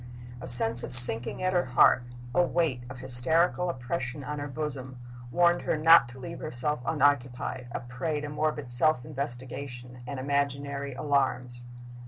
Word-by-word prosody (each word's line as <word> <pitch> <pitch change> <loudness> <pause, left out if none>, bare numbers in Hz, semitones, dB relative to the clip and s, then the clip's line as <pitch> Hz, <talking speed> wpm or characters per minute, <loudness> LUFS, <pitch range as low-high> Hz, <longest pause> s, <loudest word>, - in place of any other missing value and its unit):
A 125 - -8
sense 120 -1 +7
of - - -3
sinking 120 +3 +8
at 185 0 -1
her 175 -1 0
heart, 125 0 +2 0.3
a 180 - +2
weight 165 -7 -2
of 125 - -11
hysterical 130 +8 -1
oppression 130 -1 -6
on 150 +1 -7
her 145 - -6
bosom, 135 -3 -7 0.3
warned 175 +4 +1
her - - -3
not 155 -5 +4
to 125 +2 -14
leave 130 - -9
herself 150 +4 -4
unoccupied, 130 -2 -2
a - - -6
prey 130 +5 -5
to 150 - -7
morbid 150 -3 -4
self 125 +1 +1
investigation 125 -2 -8
and 140 -1 -7
imaginary 140 0 -4
alarms. 130 -3 -2
135 Hz, 155 wpm, -26 LUFS, 125-150 Hz, 0.3 s, sinking